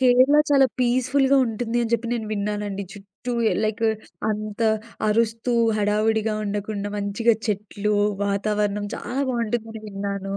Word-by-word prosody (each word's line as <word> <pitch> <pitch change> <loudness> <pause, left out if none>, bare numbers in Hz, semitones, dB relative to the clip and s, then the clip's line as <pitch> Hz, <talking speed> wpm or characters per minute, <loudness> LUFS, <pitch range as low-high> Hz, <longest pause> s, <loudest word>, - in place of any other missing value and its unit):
కేరళ 255 +3 +5
చాలా 275 -2 +6
పీస్‍‍ఫుల్‍గా 255 +3 +3
ఉంటుంది 230 0 -2
అని 225 - -2
చెప్పి 235 0 +1
నేను 225 -2 -2
విన్నానండి. 205 -1 -2
చుట్టూ 205 +4 -8 0.2
ఏ - - +1
లైక్ 215 +1 -2 0.5
అంత 215 +1 -4 0.5
అరుస్తూ 230 +2 +1 0.3
హడావిడిగా 215 +1 +1
ఉండకుండా, 205 0 -3
మంచిగా 210 +3 +2
చెట్లు, 210 0 -1 0.3
వాతావరణం 205 0 0
చాలా 260 +3 -4
బాగుంటుందని 225 -2 -3
విన్నాను. 200 -1 -4
215 Hz, 120 wpm, -23 LUFS, 205-235 Hz, 0.5 s, చాలా